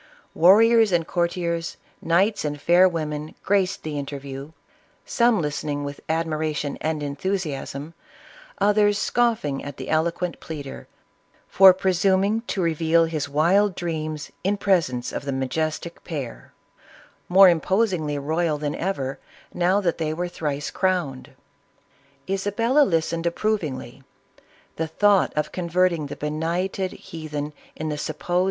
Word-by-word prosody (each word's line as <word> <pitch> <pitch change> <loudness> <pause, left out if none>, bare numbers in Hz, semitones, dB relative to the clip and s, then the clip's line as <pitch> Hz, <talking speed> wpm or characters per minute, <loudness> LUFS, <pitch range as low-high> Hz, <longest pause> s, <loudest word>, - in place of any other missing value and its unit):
Warriors 220 +5 +6
and 170 -2 +2
courtiers, 170 -1 -2 0.2
knights 190 +6 +2
and 145 -1 -3
fair 175 +5 +5
women, 155 -2 -4
graced 195 -2 +1
the 150 -2 -3
interview, 140 0 -7 0.5
some 235 -3 +3
listening 150 -1 -2
with 145 0 -6
admiration 155 -3 -1
and 155 -1 -2
enthusiasm, 145 -1 -3 0.6
others 205 0 +3
scoffing 220 -12 0
at 145 -1 -7
the 130 - -7
eloquent 170 +2 0
pleader, 145 -4 -8 0.6
for 190 0 +8
presuming 190 +3 +2
to 190 - -1
re 165 -1 +1
veal 165 +1 +3
his 155 -3 -3
wild 180 +7 +3
dreams 155 -3 -4
in 200 +2 +1
presence 165 -12 +1
of - - -4
the 140 - -3
majestic 155 +5 -3
pair, 140 -8 -6 0.8
more 190 +2 +8
imposingly 175 -3 +1
royal 155 +2 0
than 145 0 -3
ever, 140 -8 -3 0.3
now 180 +3 +2
that 175 -5 -1
they 155 -1 -1
were 175 +2 -2
thrice 145 -4 -3
crowned. 180 -9 -1 1.0
Isabella 205 +8 +1
listened 165 -3 0
approvingly. 155 - -2 0.8
The 160 - -1
thought 200 +4 +3
of 150 0 -1
con 175 -2 -4
verting 170 -3 +2
the - - -6
benighted 170 +5 -2
heathen 150 -2 -6 0.2
in 155 0 -4
the 150 -1 -3
suppose! 165 +4 -2
165 Hz, 130 wpm, -24 LUFS, 150-185 Hz, 1.0 s, for